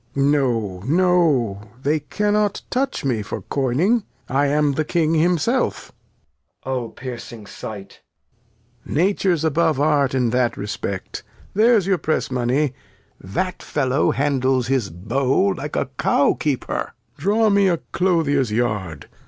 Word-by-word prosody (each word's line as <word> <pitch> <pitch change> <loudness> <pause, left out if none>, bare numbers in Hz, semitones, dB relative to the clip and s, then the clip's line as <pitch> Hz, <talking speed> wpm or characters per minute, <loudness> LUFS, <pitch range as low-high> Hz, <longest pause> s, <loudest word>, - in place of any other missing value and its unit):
Lear. 140 +1 +3
No, 115 -10 0
no; 155 - +2 0.2
they 150 +2 +2
cannot 210 +6 0
touch 265 - -1
me 120 -5 0
for 105 - -6
coyning; 155 - +1 0.2
I 140 +2 +1
am 145 0 +2
the 155 +3 0
King 160 0 +1
himself. 170 - +1 0.7
Edg. 130 - -3
O 125 -3 -2
piercing 120 -3 -8
Sight. 100 -1 -9 0.8
Lear. 160 +5 +1
Nature's 190 -5 +1
above 160 -1 +2
Art 145 -3 +2
in 125 -3 +1
that 125 -1 +1
Respect; 100 -1 -5 0.3
there's 220 -1 +4
your 190 -2 +1
Press 155 -3 -1
Money: 130 +3 +1 0.5
That 180 - -3
Fellow 135 -1 0
handles 130 -3 +1
his 130 -5 0
Bow 130 - +1
like 150 -3 -6
a - - +1
Cow 140 - +3
Keeper: 140 -5 -3 0.2
Draw 210 +6 +2
me 200 -1 +4
a 175 -2 +2
Clothier's 155 - +1
Yard. 105 -9 -2
140 Hz, 135 wpm, -21 LUFS, 125-175 Hz, 0.8 s, there's